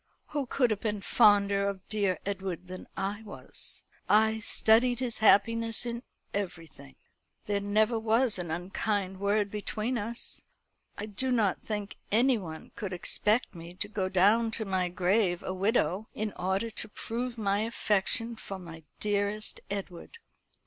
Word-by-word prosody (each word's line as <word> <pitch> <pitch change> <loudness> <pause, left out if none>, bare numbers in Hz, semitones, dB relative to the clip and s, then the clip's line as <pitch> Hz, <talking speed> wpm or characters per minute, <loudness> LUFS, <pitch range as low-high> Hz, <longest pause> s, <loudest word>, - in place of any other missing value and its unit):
Who 290 -3 -2
could 245 -2 +2
have 210 - 0
been 210 -2 -1
fonder 200 -2 +4
of 195 -1 -7
dear 200 -4 +1
Edward 190 -3 -3
than 185 0 -8
I 200 +2 -2
was? 215 - -6 0.3
I 220 +1 +4
studied 230 +2 +4
his 250 -3 -1
happiness 225 +2 +4
in 235 0 -3 0.3
everything. 165 - -5 0.5
There 205 -1 0
never 215 +3 +2
was 225 0 +2
an 175 -2 -4
unkind 190 +3 -2
word 200 0 +1
between 215 +3 -2
us. 230 +3 -4 0.6
I 205 - -4
do 220 +5 -1
not 215 -7 +2
think 210 -2 -4
anyone 215 -9 +1
could 195 -3 -4
expect 210 +5 +1
me 170 0 -9
to 205 - -3
go 200 -3 -2
down 210 +5 +4
to 220 - -1
my 185 -2 0
grave 180 0 +1
a 185 - -3
widow, 195 0 +1
in 215 -1 -2
order 190 +5 -1
to 215 - -3
prove 235 +3 -3
my 200 -2 +1
affection 225 +1 +1
for 200 -3 -7
my 165 -3 -10 0.2
dearest 205 +1 -1
Edward. 195 - -6
205 Hz, 150 wpm, -29 LUFS, 190-225 Hz, 0.6 s, fonder